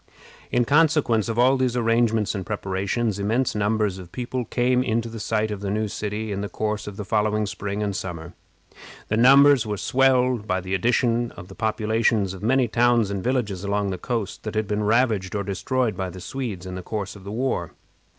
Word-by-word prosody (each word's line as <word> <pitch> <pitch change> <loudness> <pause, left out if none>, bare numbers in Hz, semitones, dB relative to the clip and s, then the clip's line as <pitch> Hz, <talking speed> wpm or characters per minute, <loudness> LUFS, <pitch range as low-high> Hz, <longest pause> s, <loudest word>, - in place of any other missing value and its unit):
In 120 -1 +2
consequence 145 -7 +3
of 115 - -2
all 130 +3 +4
these 125 -2 0
arrangements 115 -2 +2
and 95 -3 -3
preparations, 100 +2 -2
immense 115 +6 0
numbers 105 -2 0
of 90 -2 -11
people 125 0 -3
came 125 +1 +1
in 115 -3 +1
to 115 - -6
the 115 0 -7
site 110 +1 -1
of 105 - -4
the 100 - -3
new 110 +2 0
city 105 +1 -4
in 100 0 -2
the 100 - -4
course 105 -1 -3
of 100 -1 -7
the 105 - -5
following 105 0 +1
spring 100 +1 -4
and 100 -2 -2
summer. 85 -2 -6 0.8
The 110 - +1
numbers 135 0 +6
were 105 -1 -2
swelled 125 +2 +2
by 95 0 +1
the 95 +1 -5
addition 120 +3 +1
of 90 - -11
the 95 - -11
populations 110 -2 +1
of 95 - -9
many 125 +3 +2
towns 120 -2 +2
and 100 -2 -3
villages 110 -7 -1
along 100 0 0
the 90 - -4
coast 115 -2 -3
that 110 0 -6
had 110 -1 0
been 105 +1 -1
ravaged 110 -4 +1
or 100 - -1
destroyed 110 +3 -1
by 95 0 -3
the 95 - -9
Swedes 100 -2 -5
in 95 - -6
the 95 - -5
course 100 +1 -5
of 100 - -13
the 100 - -8
war. 130 +4 -2
110 Hz, 210 wpm, -24 LUFS, 100-120 Hz, 0.8 s, numbers